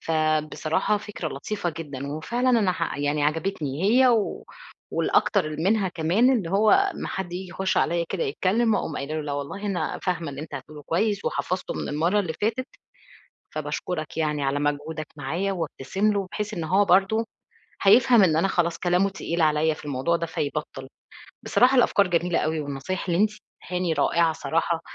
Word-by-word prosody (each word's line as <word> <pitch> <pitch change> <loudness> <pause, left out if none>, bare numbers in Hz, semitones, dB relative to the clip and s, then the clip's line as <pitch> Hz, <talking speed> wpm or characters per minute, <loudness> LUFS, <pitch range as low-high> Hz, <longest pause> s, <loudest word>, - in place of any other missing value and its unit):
فبصراحة 155 +4 0
فكرة 205 -5 -5
لطيفة 175 +6 -3
جدًا، 140 -4 -6
وفعلاً 235 - -1
أنا 215 -7 +3
ح 145 - -3
يعني 145 +1 0
عجبتني 155 -1 -2
هي، 250 +6 +5
و 225 -4 +1 0.5
والأكتر 155 - +1
منها 195 +3 +1
كمان 180 +10 +2
اللي 195 -10 -1
هو 205 +3 +4
أما 390 -2 +2
حد 180 -2 -4
ييجي 185 +1 -5
يخش 190 +2 -1
عليّا 170 0 +2
كده 190 - -2
يتكلم، 210 +10 +1
أقوم 155 - -3
قايلة 140 +3 -4
له 155 - -1
لا 145 -1 -4
والله 145 +9 -4
أنا 195 -3 -2
فاهمة 170 -4 -2
اللي 140 0 -7
أنت 155 - -8
هتقوله 150 -1 -8
كويس، 200 +6 0
وحفظته 185 +1 -2
من - - -4
المرّة 170 +8 +1
اللي 170 -5 -3
فاتت، 230 +5 0 0.9
فباشكرك 155 -4 -4
يعني 150 -2 0
على 135 +1 0
مجهودك 145 +2 -2
معايا. 170 +8 -2
وابتسم 190 +4 -1
له، 195 -2 -2
بحيث 210 0 -3
إن 170 -4 -3
هو 190 +6 +3
برضو 195 +5 +3 0.6
هيفهم 235 +2 +6
إن 160 -4 +4
أنا 195 +4 +2
خلاص 170 -2 0
كلامه 180 +2 +2
تقيل 170 -3 -2
عليّا 155 0 +3
في - - -13
الموضوع 145 +4 0
ده، 170 - -3
فيبطل. 150 -4 -4 0.6
بصراحة 255 +2 +4
الأفكار 205 -5 +4
جميلة 175 0 +1
أوي، 155 0 0
والنصايح 145 +7 -4
اللي 170 - +1
أنتِ 215 - +3 0.3
اديتيهاني 180 -1 -1
رائعة 165 +2 +2
الصراحة، 165 +1 -1
170 Hz, 170 wpm, -25 LUFS, 155-200 Hz, 0.9 s, هيفهم